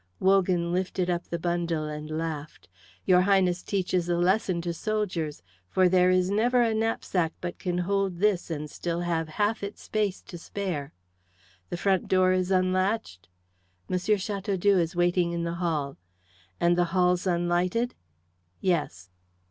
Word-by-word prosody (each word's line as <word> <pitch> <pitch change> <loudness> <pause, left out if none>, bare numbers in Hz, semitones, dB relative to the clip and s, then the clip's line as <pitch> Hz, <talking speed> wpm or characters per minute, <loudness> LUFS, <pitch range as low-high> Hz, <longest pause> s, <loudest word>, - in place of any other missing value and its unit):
Wogan 185 -3 +2
lifted 185 0 -1
up 175 0 -2
the 170 - -3
bundle 170 -2 -1
and 150 0 -6
laughed. 155 -1 -5 0.4
"Your 180 -1 +5
Highness 185 -2 +2
teaches 185 -3 -1
a 175 - +2
lesson 185 0 +2
to 170 0 -3
soldiers; 180 - -2 0.3
for 185 -1 +4
there 180 0 +4
is 185 +1 +2
never 240 +4 +3
a 225 -1 +1
knapsack 220 -6 0
but 175 0 -5
can 180 -1 -2
hold 195 0 0
this 195 -2 +1
and 150 -2 -4
still 170 +3 -3
have 165 -2 -1
half 205 +7 0
its 200 +1 -7
space 210 -3 -1
to 175 - -9
spare. 170 -7 -4 0.8
The 175 - -3
front 190 0 +1
door 185 -1 +4
is 185 0 0
unlatched?" 185 - 0 0.6
"M. 185 - +1
Chateaudoux 200 -1 +1
is 170 +1 -1
watching 175 0 +2
in 170 0 -2
the 170 0 -2
hall." 150 -5 -1 0.6
"And 175 0 +3
the 175 0 +2
hall's 180 0 +2
unlighted?" 175 +7 +1 0.7
"Yes." 95 - -1
180 Hz, 150 wpm, -27 LUFS, 170-195 Hz, 0.8 s, Your